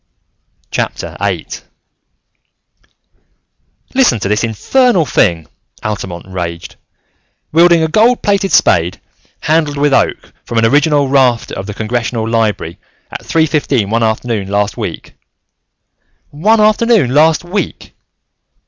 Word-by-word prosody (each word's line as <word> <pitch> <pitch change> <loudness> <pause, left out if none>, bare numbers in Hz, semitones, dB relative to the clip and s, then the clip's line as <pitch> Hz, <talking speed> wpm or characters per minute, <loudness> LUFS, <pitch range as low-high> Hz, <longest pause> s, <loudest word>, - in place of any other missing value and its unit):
VIII - - -3 2.5
"Listen 255 - +3
to 100 - -3
this 105 +3 0
infernal 180 - +1
thing!" 85 - +1 0.4
Altamont 95 -5 -5
raged. 85 -2 -6 0.8
"'Wielding 170 +1 +4
a - - +1
gold 225 +9 +2
plated 200 -2 +1
spade 85 - +2 0.4
handled 155 -2 0
with 145 0 +1
oak - - 0
from 115 - -5
an 115 - +3
original 145 +3 +2
rafter 130 -4 +1
of 95 - -6
the 105 - -6
Congressional 115 0 -2
Library, 110 -7 -1 0.3
at - - -7
three 160 -1 +1
fifteen 140 -9 -1
one 115 +1 +1
afternoon 110 -2 -1
last 100 +1 -1
week - - -6 0.6
' - - -57 0.4
One 210 +10 +2
afternoon 215 - +3
last 155 +3 +3
week!" 185 +4 -5
130 Hz, 115 wpm, -14 LUFS, 105-165 Hz, 2.5 s, Wielding